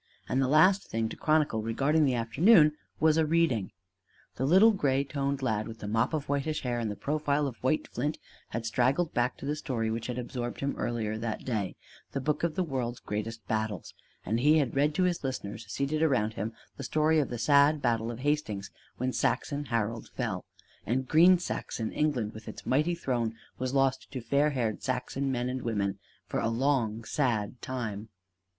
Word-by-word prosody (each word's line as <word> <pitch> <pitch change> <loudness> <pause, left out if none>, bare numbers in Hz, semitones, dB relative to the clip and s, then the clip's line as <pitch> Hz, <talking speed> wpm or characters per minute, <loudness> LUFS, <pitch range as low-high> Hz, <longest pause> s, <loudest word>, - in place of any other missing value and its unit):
And 130 - +1
the 130 - +2
last 185 +8 +4
thing 115 0 -1
to - - -7
chronicle 155 -8 +2
regarding 140 +8 +2
the 130 -3 +2
afternoon 150 - +5 0.2
was 160 0 +4
a 160 - +4
reading. 155 - +1 0.6
The 130 - -1
little 190 +8 +7
gray 140 -9 +1
toned 140 -1 -2
lad 110 -4 0
with 115 - -8
the 105 - -7
mop 115 +8 +1
of 150 -2 -3
whitish 145 +2 -1
hair 120 -2 -1
and 115 -2 -1
the 105 - -4
profile 150 +1 0
of 130 -4 -4
white 130 +4 +1
flint 145 +6 -2 0.3
had 115 +1 -4
straggled 135 +8 +1
back 120 +2 0
to - - -8
the 145 +2 -1
story 120 -7 -2
which 115 0 -3
had 125 -1 -4
absorbed 120 -1 -4
him 140 0 0
earlier 110 -2 -2
that 110 -1 -4
day 105 -7 -2 0.4
The 140 - -1
Book 150 +2 -1
of 170 -2 0
the 185 - +1
World's 125 -6 -3
Great 105 -1 -3 0.2
Battles; 110 -5 -2 0.3
and 110 +4 0
he 150 +5 +5
had 140 -5 0
read 145 +2 +2
to 185 - +2
his 180 -3 0
listeners 110 -5 -5
seated 145 +3 -1
around 120 -9 +2
him 110 +2 -4 0.2
the 140 - -6
story 155 +3 +2
of 145 - 0
the 120 - -4
sad 145 +5 +4
battle 115 -4 0
of 120 +1 -6
Hastings 140 -9 -1 0.3
when 130 +1 -1
Saxon 145 +1 0
Harold 115 -2 -2
fell, - - -3 0.4
and 130 +3 -1
green 175 +5 +6
Saxon 115 -9 -4
England 125 -8 0
with 110 0 -11
its - - -8
mighty 150 +7 +2
throne 120 -8 -1 0.2
was 130 +1 -2
lost 135 -1 +1
to 130 - -3
fair 140 +5 +2
haired 120 -7 -1
Saxon 135 +1 -2
men 125 -1 -1
and 130 0 -3
women 100 -4 -1 0.3
for - - -2
a 115 - 0
long, 115 -3 0
sad 120 -3 -1
time. 115 -4 -4
130 Hz, 195 wpm, -29 LUFS, 115-150 Hz, 0.6 s, little